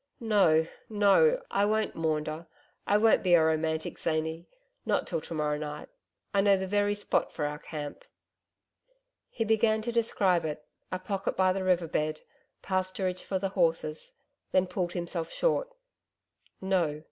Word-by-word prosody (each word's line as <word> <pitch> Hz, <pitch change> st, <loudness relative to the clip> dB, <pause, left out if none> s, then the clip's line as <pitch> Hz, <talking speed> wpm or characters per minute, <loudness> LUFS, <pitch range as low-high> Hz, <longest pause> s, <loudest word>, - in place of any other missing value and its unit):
No, 195 Hz, -8 st, +3 dB, 0.2 s
no, 220 Hz, -, +4 dB
I 200 Hz, -, +2 dB
won't 215 Hz, +1 st, +1 dB
maunder, 155 Hz, 0 st, -2 dB, 0.4 s
I 205 Hz, -, +4 dB
won't 220 Hz, +1 st, +4 dB
be 180 Hz, -2 st, +5 dB
a 165 Hz, -, +5 dB
romantic 160 Hz, 0 st, -1 dB
zany 160 Hz, +1 st, -2 dB, 0.4 s
not -, -, 0 dB
till -, -, -3 dB
to 165 Hz, -, -7 dB
morrow 150 Hz, -1 st, -1 dB
night 150 Hz, -1 st, -6 dB, 0.4 s
I 200 Hz, -, +4 dB
know 200 Hz, -1 st, +4 dB
the 190 Hz, -, -3 dB
very 205 Hz, +1 st, +1 dB
spot 205 Hz, -, 0 dB
for 150 Hz, -, -3 dB
our 150 Hz, 0 st, -4 dB
camp 150 Hz, -3 st, -7 dB, 0.6 s
....' -, -, -58 dB, 0.4 s
He 225 Hz, -, -2 dB
began 220 Hz, 0 st, +2 dB
to 235 Hz, -, -2 dB
describe 200 Hz, -6 st, +2 dB
it 150 Hz, -1 st, -5 dB, 0.3 s
a 185 Hz, -, -1 dB
pocket 195 Hz, +1 st, -3 dB
by 185 Hz, 0 st, +4 dB
the 190 Hz, 0 st, -2 dB
river 180 Hz, -2 st, +2 dB
bed 155 Hz, 0 st, -1 dB, 0.4 s
pasturage 185 Hz, -1 st, -1 dB
for 190 Hz, -, -2 dB
the 195 Hz, +1 st, -2 dB
horses 165 Hz, -4 st, -1 dB, 0.4 s
then 185 Hz, 0 st, +3 dB
pulled 180 Hz, -1 st, -3 dB
himself 170 Hz, -1 st, -3 dB
short. -, -, 0 dB, 0.9 s
No! 175 Hz, -6 st, 0 dB
185 Hz, 160 wpm, -29 LUFS, 160-205 Hz, 0.9 s, be